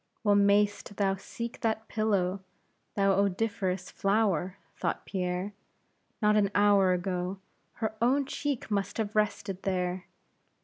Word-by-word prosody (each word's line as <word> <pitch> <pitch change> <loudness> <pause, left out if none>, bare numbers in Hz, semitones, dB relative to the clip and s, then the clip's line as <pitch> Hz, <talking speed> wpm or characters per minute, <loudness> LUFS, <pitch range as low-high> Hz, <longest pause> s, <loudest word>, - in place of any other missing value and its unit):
Well 205 -2 +4
mayst 205 0 +3
thou 195 -1 +2
seek 235 +4 -6
that 220 -1 -1
pillow, 200 -4 0 0.6
thou 195 -1 +3
odoriferous 195 -1 0
flower, 195 -3 +1 0.2
thought - - -2
Pierre; 185 +1 -2 0.7
not 210 0 +5
an 205 -2 +3
hour 205 -2 +5
ago, 180 +1 -1 0.4
her 220 -1 -3
own 270 +4 +3
cheek 280 -4 -3
must 200 -1 -1
have 215 -2 -2
rested 200 -2 0
there. 180 -1 -2
200 Hz, 125 wpm, -29 LUFS, 185-215 Hz, 0.7 s, not